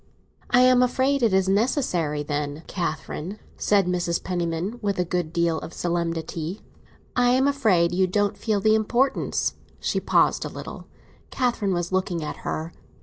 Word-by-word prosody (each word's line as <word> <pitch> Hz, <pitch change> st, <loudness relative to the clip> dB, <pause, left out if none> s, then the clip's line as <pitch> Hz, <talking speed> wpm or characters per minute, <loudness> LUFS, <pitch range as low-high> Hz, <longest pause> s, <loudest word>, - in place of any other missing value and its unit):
"I 245 Hz, -, +5 dB
am 255 Hz, 0 st, +6 dB
afraid 260 Hz, +2 st, +2 dB
it 230 Hz, -3 st, +3 dB
is 190 Hz, 0 st, +2 dB
necessary, 190 Hz, -, +1 dB
then, 145 Hz, +1 st, -3 dB
Catherine," 170 Hz, +2 st, -4 dB, 0.2 s
said 200 Hz, -2 st, +2 dB
Mrs. 175 Hz, -1 st, -1 dB
Penniman, 175 Hz, +4 st, -2 dB
with 200 Hz, -2 st, -1 dB
a 180 Hz, -, +1 dB
good 175 Hz, -2 st, -2 dB
deal 170 Hz, -1 st, +1 dB
of -, -, -9 dB
solemnity. 170 Hz, 0 st, -2 dB, 0.5 s
"I 245 Hz, 0 st, +4 dB
am 265 Hz, +2 st, +3 dB
afraid 215 Hz, -12 st, +3 dB
you 185 Hz, +1 st, +2 dB
don't 205 Hz, +2 st, +1 dB
feel 215 Hz, -3 st, 0 dB
the 215 Hz, +2 st, +4 dB
importance—" 240 Hz, +5 st, +1 dB, 0.3 s
She -, -, 0 dB
paused -, -, +2 dB
a -, -, -4 dB
little; -, -, -8 dB, 0.4 s
Catherine 240 Hz, -6 st, 0 dB
was 175 Hz, 0 st, -2 dB
looking 185 Hz, -3 st, -1 dB
at 150 Hz, -, -5 dB
her. 160 Hz, +2 st, -4 dB
185 Hz, 155 wpm, -24 LUFS, 170-225 Hz, 0.5 s, am